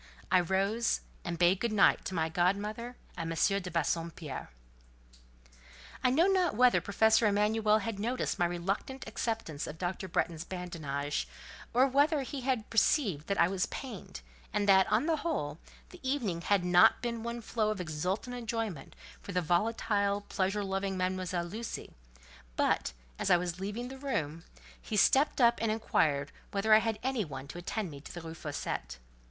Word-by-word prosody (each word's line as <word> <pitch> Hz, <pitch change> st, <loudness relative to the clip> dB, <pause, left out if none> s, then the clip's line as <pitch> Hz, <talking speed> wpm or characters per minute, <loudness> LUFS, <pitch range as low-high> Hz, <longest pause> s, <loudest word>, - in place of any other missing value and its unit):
I 185 Hz, -, +6 dB
rose, 195 Hz, +6 st, +1 dB, 0.2 s
and 170 Hz, -1 st, -3 dB
bade 180 Hz, +2 st, +4 dB
good 235 Hz, +1 st, 0 dB
night 210 Hz, -2 st, +4 dB
to 190 Hz, -, -4 dB
my 160 Hz, -1 st, +1 dB
godmother 205 Hz, +8 st, -1 dB, 0.2 s
and 165 Hz, -1 st, -4 dB
M. 195 Hz, +4 st, +2 dB
de 180 Hz, -, -6 dB
Bassompierre. 165 Hz, -, -2 dB, 1.5 s
I 255 Hz, -, +5 dB
know 305 Hz, +7 st, +4 dB
not 375 Hz, -, +2 dB
whether 250 Hz, +2 st, +5 dB
Professor 220 Hz, +2 st, +3 dB
Emanuel 210 Hz, +1 st, +3 dB
had 220 Hz, -1 st, -4 dB
noticed 235 Hz, -1 st, -1 dB
my 175 Hz, -, +3 dB
reluctant 195 Hz, +10 st, -3 dB
acceptance 220 Hz, -9 st, -3 dB
of 155 Hz, -, -7 dB
Dr. 185 Hz, +2 st, -3 dB
Bretton's 165 Hz, -2 st, -1 dB
badinage, 155 Hz, -6 st, -3 dB, 0.4 s
or 255 Hz, +2 st, +5 dB
whether 285 Hz, +2 st, +3 dB
he 270 Hz, +1 st, -5 dB, 0.3 s
perceived 215 Hz, -, +2 dB
that 200 Hz, -, -1 dB
I 170 Hz, -, +6 dB
was 190 Hz, 0 st, -1 dB
pained, 220 Hz, -, -7 dB, 0.3 s
and 205 Hz, +1 st, 0 dB
that, 190 Hz, -1 st, +5 dB
on 245 Hz, -, +3 dB
the 325 Hz, -1 st, +2 dB
whole, 285 Hz, -, -2 dB, 0.3 s
the 360 Hz, -, -13 dB
evening 245 Hz, -11 st, -1 dB
had 195 Hz, 0 st, +2 dB
not 180 Hz, +5 st, +5 dB
been 235 Hz, -1 st, -2 dB
one 235 Hz, +1 st, -4 dB
flow 220 Hz, -1 st, -1 dB
of 215 Hz, -2 st, -2 dB
exultant 180 Hz, +9 st, -3 dB
enjoyment 225 Hz, -, -4 dB, 0.3 s
for 200 Hz, -, -7 dB
the 180 Hz, -, +2 dB
volatile, 200 Hz, +3 st, +1 dB
pleasure 200 Hz, 0 st, -1 dB
loving 195 Hz, 0 st, -2 dB
Mademoiselle 185 Hz, -1 st, -1 dB
Lucie; 220 Hz, +6 st, -6 dB, 0.6 s
but, -, -, +1 dB, 0.3 s
as -, -, 0 dB
I 175 Hz, -, +7 dB
was 175 Hz, 0 st, -3 dB
leaving 210 Hz, +6 st, -4 dB
the 265 Hz, 0 st, -9 dB
room, 165 Hz, -, -3 dB, 0.4 s
he 215 Hz, -, -3 dB
stepped 275 Hz, +9 st, +4 dB
up 235 Hz, -1 st, +5 dB
and 225 Hz, -1 st, +1 dB
inquired 150 Hz, -10 st, +1 dB, 0.2 s
whether 210 Hz, +2 st, +2 dB
I 215 Hz, -, +9 dB
had 225 Hz, -1 st, -1 dB
any 260 Hz, -4 st, 0 dB
one 135 Hz, -4 st, -7 dB
to 175 Hz, -, -7 dB
attend 185 Hz, +1 st, -3 dB
me 140 Hz, -1 st, -9 dB
to -, -, -10 dB
the 175 Hz, -, -7 dB
Rue 160 Hz, 0 st, -7 dB
Fossette. 145 Hz, -, -4 dB
200 Hz, 170 wpm, -31 LUFS, 175-230 Hz, 1.5 s, I